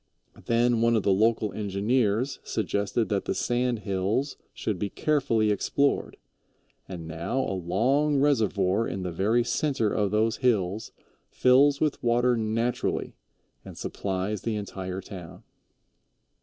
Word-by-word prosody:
Then 120 0 +2
one 115 0 +3
of 110 - +1
the 100 - +3
local 110 +1 +2
engineers 105 +4 0
suggested 100 +3 -1
that 100 -2 -1
the - - -1
sand 120 -2 0
hills 100 +8 -1 0.2
should 105 -5 -3
be 100 - -2
carefully 120 -8 +1
explored, 140 +7 0 0.7
and 85 -4 -7
now 85 +10 -3
a 130 - -2
long 125 - +1
reservoir 115 -6 +2
in 95 +1 -4
the 90 - -3
very 105 +8 +2
center 130 -6 0
of 105 -2 +1
those 110 +2 +1
hills 110 -5 0 0.4
fills 140 +3 +4
with 155 -2 0
water 120 +1 +2
naturally 115 +2 -1 0.5
and - - -11
supplies 95 +1 -3
the 115 -2 -2
entire 95 -2 -5
town. 90 -3 -10
110 Hz, 130 wpm, -27 LUFS, 100-125 Hz, 0.7 s, fills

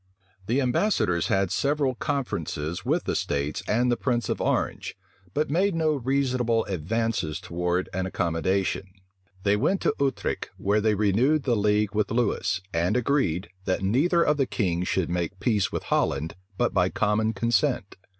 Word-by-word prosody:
The 125 +5 +2
ambassadors 125 - +1
had 95 -2 +1
several 140 -2 +1
conferences 90 - -3
with - - +1
the - - -2
states 70 +1 -1
and 120 +3 +2
the - - +3
prince 120 -4 -1
of - - -1
Orange; - - -1 0.4
but 150 0 0
made 185 +3 +2
no 160 -1 +2
reasonable 130 -4 +1
advances 100 -1 -1
towards 90 0 -1
an 95 +1 -2
accommodation. 95 +2 -1 0.6
They 100 0 +3
went 190 - +1
to - - +2
Utrecht 140 -1 -1
where 105 +2 +1
they 110 0 +2
renewed 115 +9 +2
the 125 -3 +2
league 105 -1 +1
with 105 -1 0
Lewis, 115 -4 0
and 85 +7 +1
agreed, 120 - 0 0.2
that 95 0 0
neither 155 - +3
of 150 - +2
the 135 -3 +1
kings 90 -4 -1
should 90 -3 0
make 90 +2 -2
peace 105 -2 +1
with - - -3
Holland 75 +4 0 0.2
but 120 - +1
by 90 -1 +3
common 105 +3 +1
consent. 110 -4 0
105 Hz, 160 wpm, -26 LUFS, 95-130 Hz, 0.6 s, the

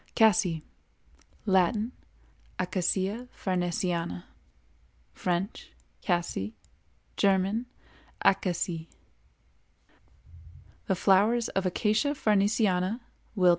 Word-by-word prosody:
CASSIE. 190 -7 +4 0.8
Latin—Acacia 190 0 -1
farnesiana; 175 - -1 0.9
French—Cassie; 175 - -3 0.6
German—Acacie. 190 -4 0 2.0
The 190 - +2
flowers 210 +6 +3
of 195 -1 0
Acacia 215 +10 +1
farnesiana 205 -1 +2 0.4
(Willd.) 180 -2 +5
190 Hz, 50 wpm, -28 LUFS, 180-215 Hz, 2.0 s, Willd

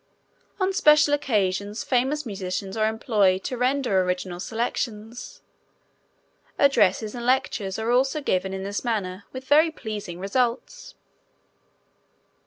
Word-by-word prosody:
On 380 0 +1
special 300 -7 +5
occasions 205 -6 0
famous 270 +4 0
musicians 190 -2 -4
are 215 -1 +2
employed 210 -4 +1
to 255 - -3
render 250 -5 +1
original 180 -1 -3
selections. 225 +1 -4 1.1
Addresses 215 -6 +3
and 240 - -6
lectures 240 -6 0
are 225 +2 -1
also 265 +5 +2
given 190 -9 -1
in 190 0 -4
this 200 +1 -4
manner 205 -5 -3
with 260 0 -8
very 310 +4 +5
pleasing 210 - -6
results. 245 - -2
220 Hz, 115 wpm, -24 LUFS, 195-260 Hz, 1.1 s, special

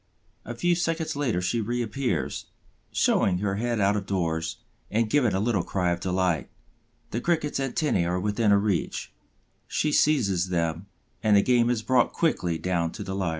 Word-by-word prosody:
A 120 - -6
few 175 +9 +2
seconds 165 -2 -1
later 120 -11 0
she 115 +6 0
reappears, 120 +3 -2 0.4
showing 90 -2 +2
her 100 +1 -1
head 120 0 -1
out 100 +1 +3
of 100 -2 -3
doors 85 -4 -1 0.3
and 115 +1 +1
giving 120 -4 +2
a - - +1
little 105 -2 +1
cry 90 -1 0
of 85 - -1
delight. 90 -4 0 0.6
The 115 - -2
Cricket's 155 -3 0
antennæ 135 - 0
are 90 +1 0
within 105 +3 +1
her 100 - +6
reach; 100 -5 -2 0.5
she 150 - 0
seizes 100 - +2
them, 85 +1 -1 0.3
and 105 -2 +4
the 100 - +4
game 120 -2 +3
is 120 -3 0
brought 125 0 +2
quickly 90 - 0
down 85 -2 -1
to - - -6
the 95 - -5
lair. 95 -3 -1
105 Hz, 175 wpm, -26 LUFS, 90-120 Hz, 0.6 s, her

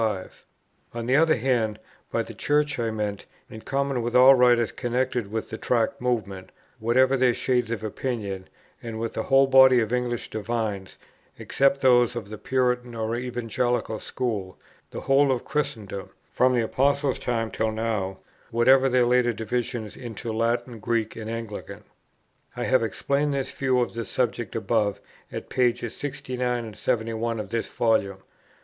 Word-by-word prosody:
On 115 -1 -3
the 130 +2 +2
other 160 +1 +5
hand, 115 -4 0 0.3
by - - 0
Church 150 -2 0
I 115 -1 0
meant, 105 -2 -4 0.2
in 110 - -9
common 135 -1 -1
with 120 +1 -3
all 130 +2 +9
writers 120 -3 +4
connected 125 -3 -2
with 110 0 -4
the 110 - -5
Tract 115 -2 0
Movement, 105 -7 -2 0.3
whatever 130 +4 +3
their 125 -2 +3
shades 125 -3 0
of 115 -2 -3
opinion, 105 -4 -4 0.3
and 115 -1 -6
with 115 0 -3
the - - -2
whole 135 +3 +4
body 130 -1 +7
of 115 0 -1
English 125 -1 -2
divines, 110 -3 -3 0.4
except 140 0 +1
those 125 -2 +4
of 110 -4 -5
the 110 - -8
Puritan 125 -2 0
or 110 0 -2
Evangelical 120 -2 -2
School, 105 -7 -3 0.3
the - - -7
whole 135 0 +3
of 125 - -2
Christendom, 115 -10 -3 0.2
from 125 0 +2
the 120 - +2
Apostles' 140 +3 +1
time 115 -2 -2
till 110 0 -1
now, 110 -4 -2 0.3
whatever 130 +3 +4
their 125 -1 +3
later 120 -1 +3
divisions 115 0 -3
into 115 -1 -6
Latin, 115 +1 -1
Greek, 115 0 -1
and 110 -1 -6
Anglican. 115 -2 -6 0.7
I 120 - -2
have 130 0 +3
explained 140 +5 0
this 135 -1 -2
view 130 -2 +1
of 120 - -2
the 115 0 -3
subject 120 0 -2
above 100 -1 0 0.3
at - - -6
pp. 120 -2 +1
69 125 -4 -3
71 115 0 -1
of 105 -3 -5
this 115 +1 -2
Volume. 105 -4 +1
120 Hz, 155 wpm, -25 LUFS, 110-130 Hz, 0.7 s, all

